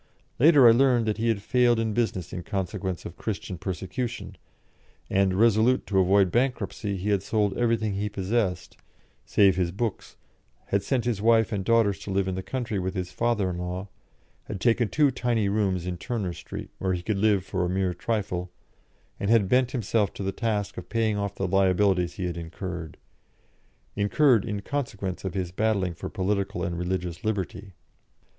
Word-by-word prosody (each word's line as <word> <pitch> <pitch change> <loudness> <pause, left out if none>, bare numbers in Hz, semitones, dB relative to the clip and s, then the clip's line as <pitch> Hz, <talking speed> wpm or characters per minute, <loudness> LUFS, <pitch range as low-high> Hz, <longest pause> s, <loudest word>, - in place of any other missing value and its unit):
Later 145 -2 +7
I - - +9
learned 120 -1 +4
that 110 -1 -1
he 115 - 0
had 105 -3 0
failed 120 0 +3
in 110 -1 0
business 95 -7 -1
in 90 - -4
consequence 95 -1 -3
of 85 - -8
Christian 95 -4 -4
persecution, 95 +7 -4 0.8
and, 95 -1 +2
resolute 115 +4 +3
to 95 -2 +1
avoid 95 0 +4
bankruptcy, 115 -5 -1
he 95 +3 -3
had 100 -2 +2
sold 100 -1 0
everything 115 -3 +1
he 105 +2 -2
possessed, 95 -2 -2 0.5
save 95 -3 +4
his 90 -2 0
books, 110 +2 -4 0.5
had 100 - +2
sent 120 +4 -1
his 115 -5 -1
wife 115 -1 +4
and 100 -3 -1
daughters 110 -2 +3
to - - -8
live 95 0 0
in 95 - -1
the 95 - -3
country 115 -2 -3
with 95 +1 -3
his 90 -1 -3
father 115 -5 0
in 90 - -5
law, 90 +2 -4 0.6
had - - -6
taken 115 +2 +2
two 150 -3 +3
tiny 120 -4 0
rooms 100 -4 0
in 90 -1 -3
Turner 110 -8 -3
Street, - - -8
where 95 -1 0
he 90 -1 -3
could 100 0 -1
live 100 -3 +2
for 95 -2 -2
a 90 - 0
mere 95 0 0
trifle, 90 -2 -2 0.7
and 100 - -1
had 115 -4 +4
bent 125 +4 +3
himself 110 -4 0
to - - -5
the 95 - -1
task 105 -4 -2
of 90 - -12
paying 115 -2 +1
off 100 -1 -3
the 95 - -2
liabilities 95 -1 +2
he 95 -4 -3
had 85 -1 -3
incurred 85 -1 -6 1.0
incurred 110 +3 +3
in 105 -3 -3
consequence 105 -10 -3
of 95 0 -4
his 90 -2 -2
battling 100 -3 0
for 85 - -7
political 100 -1 -1
and 85 0 -2
religious 90 -1 -3
liberty. 100 -2 -3
100 Hz, 180 wpm, -26 LUFS, 95-115 Hz, 1.0 s, I